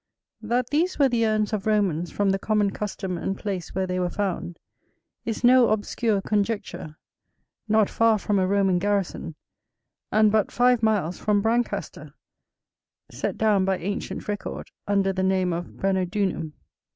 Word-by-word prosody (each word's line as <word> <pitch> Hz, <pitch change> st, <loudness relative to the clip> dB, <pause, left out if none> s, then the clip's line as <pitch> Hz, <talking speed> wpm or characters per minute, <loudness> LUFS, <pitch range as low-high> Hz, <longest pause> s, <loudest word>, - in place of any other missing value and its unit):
That 240 Hz, +3 st, -1 dB
these 335 Hz, +5 st, +1 dB
were 275 Hz, -2 st, +4 dB
the 230 Hz, -2 st, +1 dB
urns 215 Hz, 0 st, 0 dB
of 210 Hz, -1 st, -2 dB
Romans 185 Hz, -6 st, +1 dB
from 200 Hz, -1 st, +1 dB
the 195 Hz, -, 0 dB
common 210 Hz, -1 st, +1 dB
custom 190 Hz, -4 st, -4 dB
and 195 Hz, +3 st, -3 dB
place 190 Hz, -6 st, -5 dB
where 190 Hz, 0 st, 0 dB
they 185 Hz, 0 st, -2 dB
were 180 Hz, -1 st, 0 dB
found, 180 Hz, -3 st, -3 dB, 0.7 s
is 225 Hz, +1 st, -3 dB
no 250 Hz, 0 st, +6 dB
obscure 215 Hz, -1 st, 0 dB
conjecture, 205 Hz, -7 st, -2 dB, 0.7 s
not 215 Hz, -1 st, +3 dB
far 230 Hz, -1 st, +3 dB
from 205 Hz, 0 st, 0 dB
a 185 Hz, -, +2 dB
Roman 195 Hz, -2 st, +2 dB
garrison, 195 Hz, -4 st, -2 dB, 0.8 s
and 215 Hz, 0 st, +4 dB
but 215 Hz, -1 st, +1 dB
five 245 Hz, -1 st, +3 dB
miles 205 Hz, -6 st, +1 dB
from 205 Hz, -1 st, +1 dB
Brancaster, 235 Hz, +2 st, -2 dB, 1.0 s
set -, -, -3 dB
down 210 Hz, -3 st, +3 dB
by 190 Hz, 0 st, +1 dB
ancient 200 Hz, +4 st, -4 dB
record 205 Hz, -1 st, -5 dB, 0.2 s
under 195 Hz, -1 st, +2 dB
the 190 Hz, -, -2 dB
name 190 Hz, -1 st, +1 dB
of 170 Hz, +1 st, -4 dB
Branodunum. 190 Hz, -4 st, -1 dB
205 Hz, 150 wpm, -25 LUFS, 190-220 Hz, 1.0 s, no